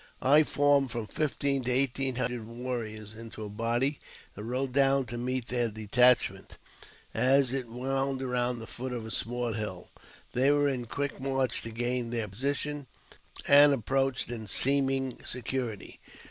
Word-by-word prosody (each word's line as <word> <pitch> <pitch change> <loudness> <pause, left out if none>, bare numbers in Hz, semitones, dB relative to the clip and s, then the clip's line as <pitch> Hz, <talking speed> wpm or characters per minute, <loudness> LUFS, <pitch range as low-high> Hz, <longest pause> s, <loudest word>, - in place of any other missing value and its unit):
I 145 +4 +6
formed 145 -2 +2
from 115 -1 -4
fifteen 140 +1 0
to 125 - +1
eighteen 135 0 +2
hundred 120 -2 -3
warriors 115 -3 -5
into 110 -1 -8
a - - -7
body, 120 +7 0 0.4
and 105 +3 -7
rode 130 +1 -2
down 135 -1 +3
to 120 0 -7
meet 125 0 -2
their 120 -2 +1
detachment 115 +4 +2 0.6
as 135 0 +3
it 130 -3 -2
wound 135 +3 -2
around 125 -1 -1
the 115 - -8
foot 125 +2 -5
of 115 -2 -5
a 110 - -7
small 120 0 -1
hill. 105 -5 -5 0.4
They 130 +3 +3
were 145 0 +3
in 130 -3 -2
quick 140 +5 -4
march 135 -1 0
to 115 - -7
gain 120 +1 -2
their 115 -2 -1
position, 140 +6 -2 0.6
and 145 0 +8
approached 135 0 0
in 110 -3 -6
seeming 135 +2 +1
security. 125 -3 -4
125 Hz, 155 wpm, -29 LUFS, 115-135 Hz, 0.6 s, and